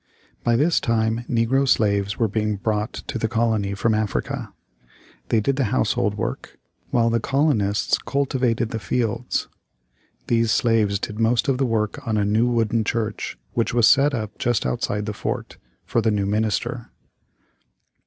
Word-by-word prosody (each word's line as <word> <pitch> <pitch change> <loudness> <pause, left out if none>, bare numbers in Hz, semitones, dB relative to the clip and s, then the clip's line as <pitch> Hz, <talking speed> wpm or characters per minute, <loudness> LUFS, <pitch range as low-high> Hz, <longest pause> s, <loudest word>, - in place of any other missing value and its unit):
By 120 - +3
this 155 +7 +3
time 115 0 0
negro 125 +4 +2
slaves 100 -4 +2
were 115 - +2
being 105 0 -1
brought 105 +3 -1
to 120 - -5
the 110 - 0
colony 110 -3 0
from 110 +3 +1
Africa. 110 -1 -2 0.8
They 115 - +3
did 135 +5 0
the 135 - +2
household 65 - 0
work, - - -5 0.3
while 115 -1 +2
the 115 - +2
colonists 120 -7 +1
cultivated 125 -3 0
the 115 - -3
fields 115 +2 -1 0.8
These 115 -1 +2
slaves 110 -4 +2
did 105 +2 -5
most 115 +4 +2
of 135 -2 +1
the 135 - +2
work 110 -2 -1
on 110 -1 +1
a 105 - +1
new 110 +4 +2
wooden 115 -2 +1
church 110 -1 -3 0.2
which 115 0 0
was 120 -2 +5
set 145 +1 +4
up 110 -2 -4
just 120 -3 0
outside 105 +11 -1
the 105 - -3
fort, - - -4 0.3
for 115 - +1
the 110 - +2
new 105 -2 0
minister. 105 -1 -1
115 Hz, 160 wpm, -23 LUFS, 105-120 Hz, 0.8 s, was